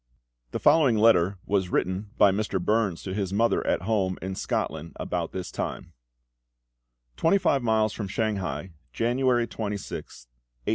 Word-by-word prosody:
The - - -3
following 140 -9 +5
letter 100 -4 +4
was 95 -3 0
written 95 +3 -1
by 100 - +6
Mr. 100 -1 -1
Burns 100 -1 0
to 95 - -4
his 95 -2 -2
mother 115 +4 +2
at - - +1
home 95 -3 0
in 95 +1 -4
Scotland 80 -3 -3
about - - -3
this 95 -1 -5
time: - - -5 1.2
"TWENTY 165 +5 +4
FIVE 140 -7 +2
MILES 110 -2 +2
FROM 105 - -4
SHANGHAI, 95 -6 -2 0.2
January 120 0 +2
26th, 105 - -6
1856. - - -46
100 Hz, 145 wpm, -26 LUFS, 95-115 Hz, 1.2 s, by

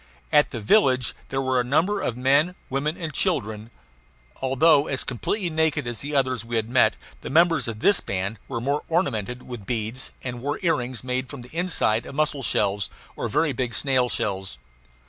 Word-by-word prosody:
At 150 0 +5
the 120 - -5
village 130 - +3 0.2
there 135 0 -1
were 130 -1 +2
a - - -2
number 165 +11 +1
of 120 - -2
men, 140 +7 +3 0.2
women, 150 +4 -1
and 160 -3 -5
children. 110 - -1 0.7
Although 140 +3 +4
as 135 - -1
completely 175 - -2
naked 155 -3 +1
as 120 -2 -4
the 145 +1 -4
others 130 -4 +1
we 115 +1 -5
had 110 -1 0
met, 125 +1 +4 0.3
the - - -6
members 165 0 +4
of 110 -1 -5
this 200 - +5
band 100 +3 -3
were 130 -3 -3
more 140 +5 0
ornamented 125 - -1
with 120 -6 -8
beads, 115 +2 -3
and 125 -2 -5
wore 145 +3 -2
earrings 125 -8 0
made 130 0 -2
from 140 -4 -8
the 125 +6 -15
inside 165 -10 +1
of - - -8
mussel 150 -2 0
shells 100 -4 0 0.3
or - - -3
very 150 -3 +1
big 120 -2 -2
snail 130 -3 +2
shells. 95 - -2
130 Hz, 185 wpm, -24 LUFS, 115-150 Hz, 0.7 s, At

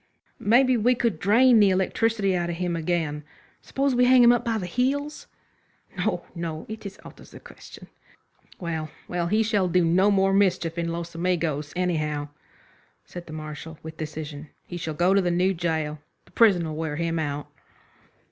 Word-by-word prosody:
"Maybe 250 +4 +4
we 245 +3 +3
could 230 -8 -1
drain 230 +5 +5
the 205 -2 +6
electricity 195 +1 +1
out 175 -1 -1
of 170 - -3
him 175 0 -2
again. 160 -3 -2 0.4
Suppose 275 0 -1
we 250 0 +4
hang 250 0 +6
him 240 - +8
up 240 -1 +1
by 230 -2 -1
the 190 - -4
heels?" 275 - -2 0.7
"No, 180 -1 -2
no, 165 -2 -5
it's 215 -2 -8
out - - -12
of - - -15
the - - -12
question." - - -13 0.7
"Well, 160 -3 -4 0.2
well, 175 -1 -2
he 215 +5 +2
shall 205 -4 +1
do 180 0 +2
no 185 +5 +3
more 195 -1 +3
mischief 180 -4 +1
in 170 - -1
Los 170 0 -5
Amigos, 165 -4 -1
anyhow," 155 -5 -1 0.8
said 175 -1 -10
the 155 - -9
Marshal, 155 0 -8
with 160 0 -9
decision. 155 -1 -7 0.2
"He 175 - -8
shall 160 -2 -4
go 175 +4 +2
into 195 0 +4
the 180 - 0
new 180 +2 +2
gaol. 160 -3 -2 0.3
The - - -23
prison 195 -7 +4
will 155 -1 -5
wear 155 -1 -3
him 165 +1 -1
out." 145 -2 -3
175 Hz, 180 wpm, -25 LUFS, 160-205 Hz, 0.8 s, him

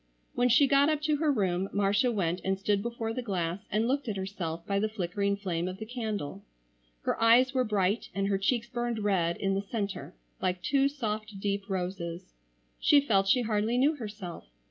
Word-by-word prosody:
When 245 0 +2
she 250 +5 +6
got 280 +2 +4
up 305 -1 +1
to 305 -1 +2
her 305 0 +2
room 190 -5 0
Marcia 205 +4 +2
went 180 -5 -1
and 190 0 0
stood 200 0 +1
before 230 0 -3
the 250 - -3
glass 180 -5 -2
and 215 +3 +1
looked 275 +1 0
at 210 -3 -2
herself 180 -4 -4
by 200 0 0
the 215 +2 0
flickering 200 0 -1
flame 180 -3 -2
of 185 0 -5
the 220 - -6
candle. 215 - -4 0.6
Her - - -1
eyes 245 +3 +5
were 260 -1 +2
bright 205 -1 0
and 195 0 0
her 195 -1 +1
cheeks 235 +4 +1
burned 240 -1 -2
red 190 -5 +1
in 195 -1 0
the 195 - 0
centre 200 - -4 0.3
like 180 0 -1
two 275 -1 +3
soft 215 -6 -4
deep 200 0 -2
roses. 180 - -4 0.5
She 290 - +6
felt 200 -8 +2
she 245 +5 +4
hardly 220 +1 0
knew 285 +5 +3
herself. 205 - -7
205 Hz, 195 wpm, -29 LUFS, 195-240 Hz, 0.6 s, she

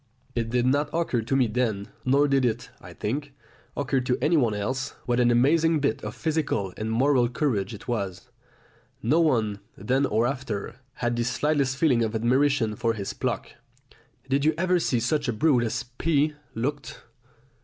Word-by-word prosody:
It 115 -1 -2
did 120 +1 +1
not 145 +3 +2
occur 165 -8 0
to 120 +4 -1
me 130 -2 +4
then, 110 -3 -1 0.2
nor 140 +3 +4
did 135 -1 +2
it, 120 -3 -1
I - - -11
think, 140 +6 -4 0.4
occur 140 -1 +1
to 125 0 0
anyone 140 -7 +2
else, 130 +6 -3
what 120 0 +1
an 120 -1 +4
amazing 155 +7 +3
bit 140 -6 -1
of 105 0 -5
physical 150 - -1
and 110 +1 -3
moral 125 +1 +3
courage 120 -8 -1
it 105 - -13
was. 100 -7 -3 0.8
No 145 +9 +3
one, 110 -10 +1 0.2
then 135 +2 +1
or 110 +3 +1
after, 120 -4 -3 0.2
had 120 -1 -1
the 120 - +1
slightest 135 +2 0
feeling 135 -6 +3
of 110 0 -2
admiration 125 0 +2
for 115 +1 0
his 100 -3 -4
pluck. - - -3 0.8
"Did 135 +1 +1
you 155 +1 +3
ever 180 +1 +2
see 125 -7 +1
such 145 +5 0
a 125 - 0
brute 130 +2 +3
as 115 - -2
P 145 +4 0 0.2
looked?" 140 +5 -4
125 Hz, 175 wpm, -26 LUFS, 115-145 Hz, 0.8 s, me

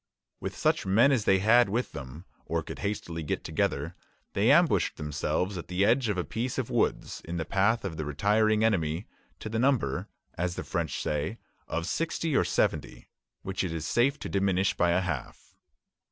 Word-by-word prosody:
With - - -5
such - - +2
men 110 +9 +4
as 120 -6 +1
they 95 - +5
had 110 +4 +5
with 120 +5 -1
them, 75 +3 -8 0.2
or 80 0 -1
could - - -8
hastily 95 -4 -3
get 75 - -3
together, - - -1 0.4
they - - +3
ambushed - - +4
themselves 80 +5 -2
at - - -8
the 90 +2 +1
edge 120 +1 +3
of 100 - 0
a 90 - 0
piece 120 +6 -3
of 130 -2 -2
woods, 120 - 0
in 85 +1 -5
the 80 - -2
path 100 +3 +1
of 80 -5 -4
the 80 - -2
retiring 105 +8 +2
enemy, 85 -5 +1 0.4
to - - -5
the 110 +1 -2
number, 120 - +1 0.3
as 90 +1 -2
the - - -4
French 85 -4 -2
say, 75 +8 -2 0.3
of 85 0 -2
sixty 160 - -1
or - - +4
seventy, - - -1 0.3
which 95 0 -2
it 90 - -2
is 80 -1 -4
safe 135 +4 +2
to - - -4
diminish 95 -1 +1
by 85 - +2
a 85 +2 +3
half. 80 -9 -5
95 Hz, 190 wpm, -28 LUFS, 85-110 Hz, 0.4 s, they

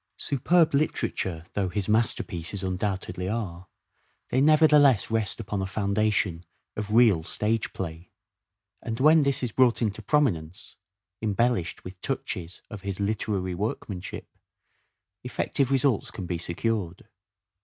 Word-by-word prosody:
Superb 160 +5 +2
literature 95 - -1
though 95 -2 0
his 95 +1 -2
masterpieces 100 -4 0
undoubtedly 95 -1 -2
are, 95 -5 -4 0.6
they 130 - +2
nevertheless 150 - +5
rest 110 -1 0
upon 105 -3 -3
a 95 - -2
foundation 100 -3 0 0.3
of 105 -1 -4
real 110 -9 +5
stage 110 +6 -1
play. 85 -1 -6 0.7
And 115 0 -4
when 155 +3 +6
this 140 -2 +1
is 120 - -1
brought 125 -1 +3
into 110 -4 -1
prominence, 95 - 0 0.5
embellished 110 -4 0
with 90 0 -10
touches 95 -9 -4
of 105 - -9
his 100 -1 -4
literary 100 -2 -1
workmanship, 95 -1 -4 1.0
effective 125 +2 -1
results 135 -4 +2
can 95 - -7
be 85 -1 -3
secured. 90 +1 -2
105 Hz, 120 wpm, -26 LUFS, 90-120 Hz, 1.0 s, when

